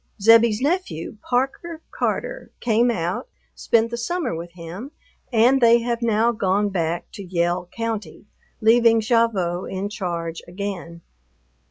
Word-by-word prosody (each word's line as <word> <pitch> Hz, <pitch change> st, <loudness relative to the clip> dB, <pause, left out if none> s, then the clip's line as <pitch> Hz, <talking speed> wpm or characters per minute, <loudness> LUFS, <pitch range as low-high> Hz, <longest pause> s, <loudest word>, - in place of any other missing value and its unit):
Zebbie's 225 Hz, +1 st, +5 dB
nephew, 290 Hz, -, -2 dB
Parker 270 Hz, +7 st, -2 dB
Carter, -, -, -3 dB
came 235 Hz, +1 st, +2 dB
out, 175 Hz, -, -2 dB, 0.3 s
spent 230 Hz, 0 st, +1 dB
the 235 Hz, -, -3 dB
summer 295 Hz, +2 st, -2 dB
with 170 Hz, +1 st, -7 dB
him, 180 Hz, +9 st, -8 dB, 0.4 s
and 245 Hz, +3 st, +4 dB
they 235 Hz, 0 st, +6 dB
have 235 Hz, 0 st, -2 dB
now 230 Hz, 0 st, +2 dB
gone 205 Hz, -2 st, +1 dB
back 170 Hz, -3 st, -2 dB
to 200 Hz, -, -8 dB
Yell 175 Hz, 0 st, -1 dB
County, 220 Hz, -7 st, -5 dB, 0.4 s
leaving 230 Hz, +1 st, +5 dB
Gavotte 215 Hz, -6 st, +1 dB
in 195 Hz, +2 st, -3 dB
charge 170 Hz, -5 st, -4 dB
again. 175 Hz, -3 st, -6 dB
215 Hz, 130 wpm, -22 LUFS, 175-235 Hz, 0.4 s, they